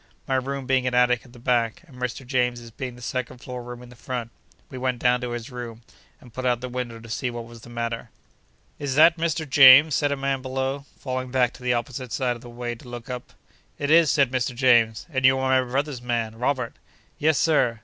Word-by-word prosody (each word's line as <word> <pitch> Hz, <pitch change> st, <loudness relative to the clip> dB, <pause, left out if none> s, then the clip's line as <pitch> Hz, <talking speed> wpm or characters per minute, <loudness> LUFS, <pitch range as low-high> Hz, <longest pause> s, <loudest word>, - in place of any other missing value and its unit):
My -, -, -1 dB
room 135 Hz, +1 st, -2 dB
being 130 Hz, -1 st, +1 dB
an 125 Hz, -, 0 dB
attic 125 Hz, 0 st, +3 dB
at 125 Hz, -, -17 dB
the -, -, -14 dB
back, 120 Hz, +2 st, 0 dB
and 145 Hz, -7 st, -17 dB
Mr. 125 Hz, +1 st, -4 dB
James's 125 Hz, -2 st, -1 dB
being 125 Hz, +2 st, -6 dB
the 125 Hz, -, -12 dB
second 130 Hz, 0 st, -3 dB
floor 125 Hz, 0 st, -7 dB
room 120 Hz, 0 st, -9 dB
in 125 Hz, -, -13 dB
the 125 Hz, -, -14 dB
front, 120 Hz, -1 st, -5 dB, 0.4 s
we -, -, -8 dB
went 130 Hz, -1 st, -1 dB
down 125 Hz, +1 st, +2 dB
to 125 Hz, -, -3 dB
his 120 Hz, +2 st, -6 dB
room, 120 Hz, -2 st, -7 dB, 0.4 s
and 120 Hz, -3 st, -17 dB
put 130 Hz, -, -5 dB
up 125 Hz, -2 st, +1 dB
the 125 Hz, 0 st, -6 dB
window, 120 Hz, -2 st, -5 dB
to 115 Hz, -, -12 dB
see 125 Hz, +3 st, -2 dB
what 120 Hz, -1 st, -6 dB
was 115 Hz, 0 st, -13 dB
the 120 Hz, -, -13 dB
matter. 115 Hz, 0 st, -4 dB, 0.7 s
'Is 140 Hz, -2 st, -2 dB
that 165 Hz, +3 st, +6 dB
Mr. 160 Hz, -1 st, -1 dB
James?' 140 Hz, +2 st, +8 dB
said 145 Hz, 0 st, +1 dB
a 140 Hz, -, -1 dB
man 135 Hz, -1 st, -1 dB
below, 135 Hz, +2 st, -3 dB
falling 130 Hz, -1 st, -4 dB
back 125 Hz, -1 st, +2 dB
to 130 Hz, -, -15 dB
the 125 Hz, -1 st, +1 dB
opposite 125 Hz, 0 st, -4 dB
side 125 Hz, -3 st, 0 dB
of 120 Hz, -, -12 dB
the 120 Hz, -, -11 dB
way 120 Hz, 0 st, -4 dB
to 120 Hz, +1 st, -13 dB
look 120 Hz, 0 st, -7 dB
up. 125 Hz, -1 st, -7 dB, 0.4 s
'It 145 Hz, +1 st, -1 dB
is,' 165 Hz, -1 st, +6 dB
said 140 Hz, -4 st, +3 dB
Mr. 125 Hz, -1 st, -1 dB
James, 120 Hz, -3 st, +3 dB
'and 130 Hz, -2 st, -1 dB
you 130 Hz, +1 st, +6 dB
are 130 Hz, 0 st, +3 dB
my 125 Hz, -, -9 dB
brother's 140 Hz, -1 st, -1 dB
man, 115 Hz, -2 st, -2 dB
Robert.' 125 Hz, 0 st, -2 dB, 0.4 s
'Yes, 155 Hz, -1 st, +3 dB
Sir. 125 Hz, -8 st, +2 dB
125 Hz, 235 wpm, -24 LUFS, 120-130 Hz, 0.7 s, James